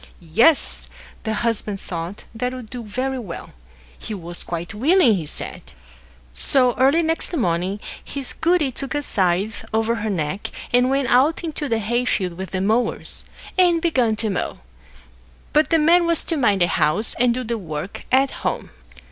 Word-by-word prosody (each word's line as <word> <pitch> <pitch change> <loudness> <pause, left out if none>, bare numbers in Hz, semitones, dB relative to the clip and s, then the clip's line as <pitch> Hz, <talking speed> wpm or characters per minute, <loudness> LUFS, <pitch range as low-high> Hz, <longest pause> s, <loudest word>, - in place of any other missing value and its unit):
Yes! 280 - +5 0.4
the 220 0 0
Husband 210 -3 -1
thought 170 +3 -6
that 250 +3 -2
would 250 -4 -9
do 245 - -5
very 255 +5 -3
well. 190 -8 -8 0.5
He 215 - -5
was 175 -2 -6
quite 170 +3 -5
willing, 270 - +4
he 170 -6 -2
said. - - -6 0.7
So, 250 - +3
early 280 +6 +4
next 325 +2 0
morning, 185 - 0 0.2
his 275 -2 -3
goody 325 -4 +2
took 275 +3 -3
a 290 - -1
scythe 195 0 0
over 225 +1 +1
her 220 0 -2
neck, 180 0 -2 0.2
and 250 +1 +4
went 270 -1 +1
out 275 +8 +3
into 310 -3 -3
the 225 - +2
hayfield 220 -4 0
with 190 +1 -6
the 185 - -2
mowers, 225 +4 0 0.3
and 350 -2 +5
began 255 -10 +2
to 215 0 -2
mow; 190 - -3 0.9
but 305 +1 +4
the 330 - +4
man 335 +3 +4
was 335 -2 +3
to 330 - -1
mind 210 - +2
the 175 - +5
house, 175 +7 +1
and 240 -1 +3
do 255 - -2
the 235 -1 -3
work 155 0 -6
at 265 +1 +4
home. - - -3
235 Hz, 170 wpm, -22 LUFS, 195-275 Hz, 0.9 s, Yes